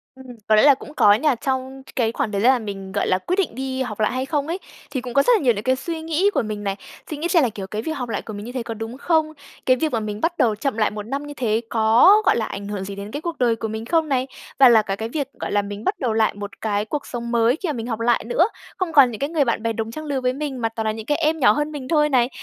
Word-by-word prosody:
Ừm, 265 0 -14 0.2
có 215 - +5
lẽ 215 - +5
là 285 -1 +8
cũng 295 - -12
có 205 - +6
nha. 260 +5 +2
Trong 265 +1 -3
c - - -17
cái 230 -3 +1
khoảng 240 -4 -2
thời 200 - -1
gian 245 +4 +6
mà 255 - 0
mình, 195 -3 -7
gọi - - -1
là, 185 - +3
quyết 345 - -2
định 345 -11 0
đi 265 0 -3
học 220 -4 -4
lại 215 - +2
hay 255 +1 -2
không 290 +1 -1
ấy, 340 +3 -2 0.3
thì 265 -3 -2
cũng 245 -1 -7
có 275 - +5
rất - - +4
là - - +2
nhiều 245 - +4
những 205 0 -5
cái 260 +2 +2
suy 325 +4 -5
nghĩ 325 +5 +1
của - - +2
mình 215 -2 -5
này. 195 -1 -1 0.3
Suy 305 - -4
nghĩ 320 +4 -2
xem 340 -4 +4
là, 245 - +2
kiểu, 200 -3 -7
cái 210 +3 -4
việc 320 - -4
học 250 -6 -4
lại - - -2
của 220 - -9
mình 205 +1 -7
như 245 - -6
thế 250 -1 -3
có 230 -1 -5
đúng 225 +3 -7
không? 315 -1 +1 0.3
Cái 255 - +5
việc 310 +3 -1
mà 230 - 0
mình 210 0 -5
bắt 340 +1 0
đầu 220 -3 +2
chậm 250 +1 -2
lại 215 - +2
1 210 0 -6
năm 275 +6 -4
như 290 - -7
thế 230 -4 0
có, 235 - +5
gọi - - +4
là, 220 - 0
ảnh 200 0 -6
hưởng 205 -2 -4
gì 200 0 -6
đến 200 +2 -7
cái 290 - -4
cuộc 340 -1 -4
đời 235 -2 +2
của 225 - -4
mình 220 +1 -5
không 320 +1 +1
này? 260 -1 +1 0.3
Và 260 -2 +9
là 225 -2 +6
cả 195 -2 -3
cái 225 +2 -5
việc, 285 0 -2
gọi - - -4
là, 205 - +2
mình 205 +1 -7
bắt - - -1
đầu 240 -4 0
lại 220 0 +2
một 205 0 -8
cái 210 -1 0
cuộc 290 +6 -4
sống 235 -1 -5
mới 235 +2 +3
khi 360 - -2
mà - - 0
mình 230 -1 -5
học 225 -2 -3
lại 235 0 +2
nữa, 335 - +3 0.3
không 360 -4 -2
còn 270 -4 +7
những 215 - -7
cái 280 - -1
người 310 -4 +1
bạn 230 -2 -1
bè 230 0 0
đồng 225 0 -4
trang 310 +6 -7
lừa 275 -3 -2
với 250 0 +1
mình 275 -3 -4
mà 225 - +1
toàn 225 -1 -4
là 215 - +1
những 220 0 -7
cái 295 - +1
em 320 0 +1
nhỏ 245 -6 +6
hơn 295 +7 -1
mình 275 -4 -6
thôi 300 -1 +3
này. 250 -3 +3
245 Hz, 335 wpm, -22 LUFS, 220-290 Hz, 0.3 s, Và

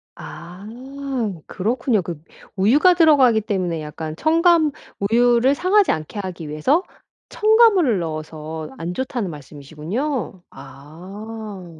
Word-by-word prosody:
아. 180 +4 -10 0.8
그렇군요. 225 +2 0
그 170 -3 -7 0.3
우유가 265 - +4
들어가기 285 -10 +5
때문에 185 -6 -2
약간 155 +1 -6
첨가 325 - +3 0.3
우유를 240 +5 +3
상하지 375 +5 +3
않게 155 +6 -4
하기 175 -5 -6
위해서 260 - +1 0.5
첨가물을 425 - +4
넣어서 155 -1 -6
안 170 +2 -4
좋다는 245 -3 -3
말씀이시군요. 160 - -5
아. 180 +6 -10
200 Hz, 260 characters per minute, -21 LUFS, 160-270 Hz, 0.8 s, 들어가기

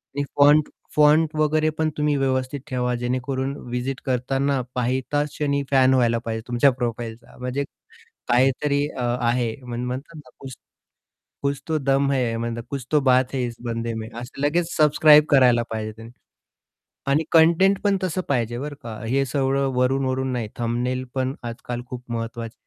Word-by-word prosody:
आणि 145 - 0
font 145 +1 +5 0.3
font 150 +1 +4
वगैरे 155 0 +2
पण 160 0 +1
तुम्ही 150 -1 +1
व्यवस्थित 130 0 -1
ठेवा, 125 -1 -1
जेणेकरून 130 +2 -2
व्हीजीट 125 +2 -3
करतांना 135 +1 0
पाहिताच 130 +4 0
क्षणी 140 -1 -1
फॅन 130 -1 +5
व्हायला 120 -2 +3
पाहिजे 110 -1 -3
तुमच्या 125 +3 +4
प्रोफाइलचा 120 -2 -5
म्हणजे 125 +3 -2 0.7
काहीतरी 135 +3 +2
अ, 130 - -6 0.2
आहे 120 -1 0
म्हण 120 0 -5
म्हणतात 130 +6 -5
ना, 135 -5 -13
कुछ 135 -1 -9 0.9
कुछ 140 -1 -1
तो 155 -1 +1
दम 135 0 +1
है, 120 -4 0 0.3
कुछ 135 -3 -4
तो 150 - +5
बात 130 +1 +2
है 130 - 0
इस 120 - -6
बंदे 115 0 -3
मे. 110 0 -5
असं 125 +3 -9
लगेच 165 +4 0
सबस्क्राईब 150 0 +6
करायला 125 -4 +5
पाहिजे 110 -1 -4
त्यांनी. 115 +1 -11 1.0
आणि 150 +3 +2
कंटेंट 170 +4 +5
पण 200 -1 +3
तसं 185 0 -1
पाहिजे 120 -3 0
बरं 145 +2 -5
का? 115 -2 -7
हे 135 +3 +1
सगळं 135 +1 0
वरून-वरून 130 +1 0
नाही. 120 -4 -2
थंबनेल 125 +2 -1
पण 130 0 -1 0.2
आजकाल 120 +1 -6
खूप 125 -1 -7
महत्वाचं 115 0 -4
130 Hz, 155 wpm, -23 LUFS, 120-145 Hz, 1.0 s, सबस्क्राईब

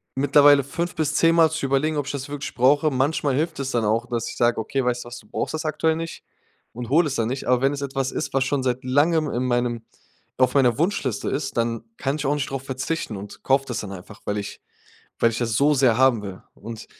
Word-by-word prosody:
mittlerweile 145 +1 +5
5 170 +6 -4
bis 155 -1 -1
10 165 0 +4
mal 165 -1 +5
zu 160 -3 -2
überlegen, 145 +3 +1
ob 145 - -1
ich - - -2
das 140 0 -5
wirklich 145 0 -5
brauche. 145 +5 +3
Manchmal 135 +1 0
hilft 160 +2 -1
es 135 -1 -2
dann 120 -2 0
auch, 110 +3 +1
dass 120 -2 -3
ich - - -8
sage: 120 0 +2
„Okay, 135 +5 -1
weißt 125 0 0
du - - -10
was? 120 0 -8
Du 105 - -19
brauchst - - -3
das 155 +1 -4
aktuell 160 +1 +1
nicht“ 165 0 -6 0.5
und 120 0 -6
hole 155 +4 +4
es 140 - -3
dann 115 0 0
nicht. 130 +2 -4
Aber 125 0 +3
wenn 135 +1 +2
es 140 - -5
etwas 135 -1 -2
ist, - - -4
was 135 -1 +2
schon 140 0 0
seit 125 0 -1
Langem 150 +4 +2
in 125 +2 -1
meinem 120 -2 0 0.5
auf 130 0 +2
meiner 125 -4 +4
Wunschliste 160 - -1
ist, 135 -2 -3
dann 115 -1 -1
kann 135 +1 -1
ich 150 - -4
auch 140 - +2
nicht 145 0 -2
drauf 135 -1 -4
verzichten 130 -1 -3
und 100 +1 -10
kaufe 135 0 +2
das 120 - -3
dann 105 - -7
einfach, 95 +3 -11
weil 105 - -1
ich 100 - -7 0.6
weil 115 - +4
ich 115 - -4
das 115 -3 -1
so 145 +6 +4
sehr 130 -5 +3
haben 130 -4 +4
will. 95 -2 -8
Und 115 -1 -9
135 Hz, 250 wpm, -23 LUFS, 120-145 Hz, 0.6 s, mittlerweile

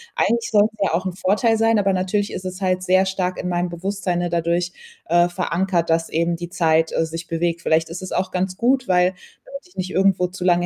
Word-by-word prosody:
Eigentlich 235 0 +1
soll's 215 0 +4
ja 195 - +1
auch 185 +3 -2
'n 185 - -2
Vorteil 210 +5 +2
sein, 225 0 +3
aber 195 -1 +2
natürlich 190 +3 -1
ist 185 - -6
es 185 +1 -6
halt 185 -1 +1
sehr 185 +1 +3
stark 185 -1 -2
in 180 - -4
meinem 175 0 -1
Bewusstsein, 185 +1 -3
ne, 175 0 -1
dadurch, 170 +1 0 0.3
äh, 175 +1 +3
verankert, 175 -1 -1
dass 165 0 +1
eben 170 +1 0
die 175 0 -7
Zeit, 160 -2 +2
äh, 165 - +1
sich 165 +1 -7
bewegt. 170 0 -1
Vielleicht 160 0 +1
ist 175 +3 -6
es 185 - -7
auch 185 - -1
ganz 185 0 -2
gut, 255 +2 +1
weil 180 -1 +4 0.4
damit 275 -5 -10
ich 180 - -25
nicht 185 0 -4
irgendwo 190 -1 +2
zu 180 0 -8
lange 175 -1 +3
180 Hz, 230 wpm, -21 LUFS, 170-190 Hz, 0.4 s, soll's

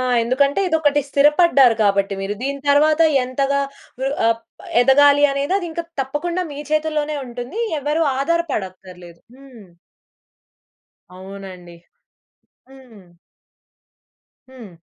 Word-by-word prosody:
ఆ! - - -1 0.2
ఎందుకంటే, 275 +7 +1
ఇదొకటి 295 -3 +1
స్థిరపడ్డారు 280 -3 +4
కాబట్టి 200 0 +1
మీరు. 195 +2 -3
దీని 280 +1 -3
తరువాత 305 +2 +3 0.2
ఎంతగా 275 +2 -1 0.4
ర్ 270 - 0 0.2
ఆప్ 230 0 -1 0.4
ఎదగాలి 285 +3 +5
అనేది 280 +7 -1
అదింక 340 -3 -5 0.2
తప్పకుండా 340 +7 -3
మీ 285 - -8
చేతుల్లోనే 305 -1 -1
ఉంటుంది. 245 - -7 0.2
ఎవరు 300 +3 -1 0.2
ఆధారపడక్కర్లేదు. 190 - -4 0.2
హ్మ్. 250 -9 -16 1.5
అవునండి. 185 -2 -11 0.9
హ్మ్. 245 -8 -17 1.4
హ్మ్. 220 -10 -14
275 Hz, 95 wpm, -19 LUFS, 205-295 Hz, 1.5 s, ఎదగాలి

